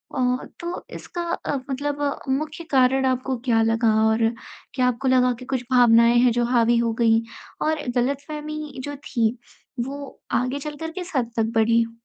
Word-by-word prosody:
ओ, 250 0 0
तो 345 +1 -5
इसका 350 - -6 0.2
अ, 285 - 0
मतलब 285 +1 -2
मुख्य 305 +4 -2
कारण 265 0 +4
आपको 255 0 0
क्या 225 -2 +3
लगा 225 0 +2
और 225 +1 +3 0.5
क्या 255 -2 +2
आपको 250 +2 -1
लगा 250 -1 +4
कि 255 - -9
कुछ 260 -2 -2
भावनाएँ 235 -1 +6
हैं 245 -1 +5
जो 240 +1 +1
हावी 235 -1 +3
हो 230 -1 +1
गई 225 -1 +4 0.4
और 310 -1 0 0.2
गलतफ़हमी 295 +2 -3
जो 290 0 -5
थी 235 -4 -1 0.5
वो 280 +1 -8 0.2
आगे 255 +3 -2
चलकर 300 +2 -6
किस 360 -3 -7
हद 240 -2 0
तक 225 0 +1
बढ़ी? 230 +1 +3
255 Hz, 165 wpm, -23 LUFS, 235-285 Hz, 0.5 s, भावनाएँ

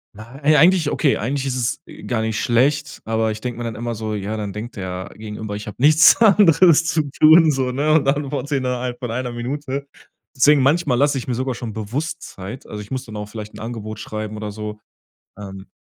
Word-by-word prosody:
Nei 135 +8 0
eigentlich 165 0 +4
okay, 145 -3 +1
eigentlich 135 +4 -2
ist 130 -2 -2
es 120 -1 -2 0.3
gar 120 -3 0
nicht 110 -1 -2
schlecht, 140 +4 +1
aber 110 0 0
ich 110 0 -4
denk 125 +1 -4
mir 120 - -6
dann 115 -2 -4
immer 120 +2 -4
so: 110 -1 -4
„Ja, 105 +1 -4
dann 105 -2 -4
denkt 110 +4 -7
der 95 0 -5
Gegenüber, 105 -1 -6
ich 105 +1 -7
hab 105 - -8
nichts 155 +5 +6
anderes 185 -6 +5
zu 155 -1 +1
tun 155 +2 +6
so“, 130 -2 -1
ne? 145 +4 0
Und 150 -3 +3
antworte 145 +1 -1
innerhalb 125 -2 -2
von 125 -2 -5
1 125 +1 -3
Minute. 135 +3 -4 0.5
Deswegen 140 +2 +5
manchmal 145 -2 +2
lass 145 +2 +3
ich 135 -3 -4
mir 125 - -1
sogar 130 +1 -2
schon 115 -2 -6
bewusst 145 +10 -4
Zeit. 100 +7 -9
Also, 105 - -7
ich 105 - -12
muss 130 0 -4
dann 110 - -10
auch 105 0 -6
vielleicht 105 -1 -8
'n - - -10
Angebot 110 -2 -6
schreiben 110 0 -6
oder 105 -1 -5
so 105 0 -7 0.6
ähm, 95 -1 -9
125 Hz, 210 wpm, -20 LUFS, 110-145 Hz, 0.6 s, nichts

